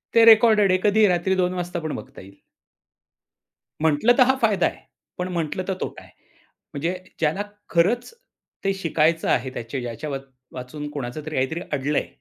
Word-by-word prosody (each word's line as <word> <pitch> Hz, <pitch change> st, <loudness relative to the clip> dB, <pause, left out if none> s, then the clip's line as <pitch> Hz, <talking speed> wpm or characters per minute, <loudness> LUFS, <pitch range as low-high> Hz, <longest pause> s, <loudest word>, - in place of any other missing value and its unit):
ते 230 Hz, -, +7 dB
रेकॉर्डेड 220 Hz, -3 st, +6 dB
आहे 185 Hz, -, +3 dB
कधी 210 Hz, +1 st, +5 dB
रात्री 180 Hz, +1 st, +1 dB
2:00 180 Hz, -1 st, +1 dB
वाजता 175 Hz, -1 st, -3 dB
पण 155 Hz, -2 st, -4 dB
बघता 135 Hz, +2 st, -10 dB
येईल. 100 Hz, +1 st, -16 dB, 1.4 s
म्हटलं 160 Hz, +10 st, +4 dB
तर 255 Hz, -, +8 dB
हा 265 Hz, -, +4 dB
फायदा 215 Hz, -4 st, +3 dB
आहे. -, -, -7 dB, 0.4 s
पण 180 Hz, 0 st, -2 dB
म्हटलं 165 Hz, +1 st, -2 dB
तर 190 Hz, -, 0 dB
तोटा -, -, -5 dB
आहे. -, -, -18 dB, 0.6 s
म्हणजे 170 Hz, +6 st, -2 dB, 0.2 s
ज्याला 165 Hz, +5 st, 0 dB, 0.3 s
खरंच 220 Hz, -, +1 dB, 0.5 s
ते 195 Hz, -, +2 dB
शिकायचं 165 Hz, -2 st, +1 dB
आहे 130 Hz, +2 st, +1 dB
त्याचे 120 Hz, +3 st, -5 dB
याच्यावाचून 130 Hz, +2 st, -7 dB
कोणाचं 135 Hz, -1 st, -5 dB
तरी 155 Hz, -, -5 dB
काहीतरी 135 Hz, +6 st, -1 dB
अडलंय, 145 Hz, +1 st, 0 dB
165 Hz, 155 wpm, -23 LUFS, 140-190 Hz, 1.4 s, तर